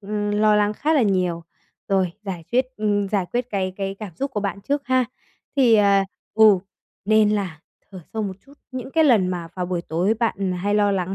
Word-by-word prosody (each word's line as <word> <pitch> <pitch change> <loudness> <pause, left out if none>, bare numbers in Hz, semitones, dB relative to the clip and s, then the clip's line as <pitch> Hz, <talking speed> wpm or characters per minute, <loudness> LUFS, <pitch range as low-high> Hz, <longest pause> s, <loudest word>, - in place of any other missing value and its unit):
ờ, 205 0 -3
lo 215 0 +4
lắng 210 0 +2
khá 305 +8 0
là 275 - +4
nhiều, 180 -4 0 0.5
rồi, 190 -3 +1
giải 180 -5 -6
quyết, 255 +1 +3
ừm, 205 -2 0
giải 195 -3 0
quyết, 245 0 -2
cái 190 -2 -1
cái 195 0 -3
cảm 200 -7 -8
xúc 275 0 -2
của 210 - -3
bạn 200 0 -3
trước 280 +4 -2
ha. 255 -1 +3 0.5
Thì 245 -4 +5
à, 200 -2 +4 0.3
ừ, 215 -3 +6 0.5
nên 215 0 +4
là 185 -7 -2 0.3
thở 190 - -9
sâu 220 -1 -2
một 190 -2 -4
chút, 280 - -17 0.2
những 260 +1 -6
cái 320 +1 +3
lần 215 -10 +4
mà 175 -2 -4
vào 180 -1 -3
buổi 175 -1 -2
tối 180 +7 0
bạn, 200 -5 -1
à, - - -4
hay 205 +3 -1
lo 205 -1 +3
lắng 190 0 -2
205 Hz, 220 wpm, -22 LUFS, 185-220 Hz, 0.5 s, ừ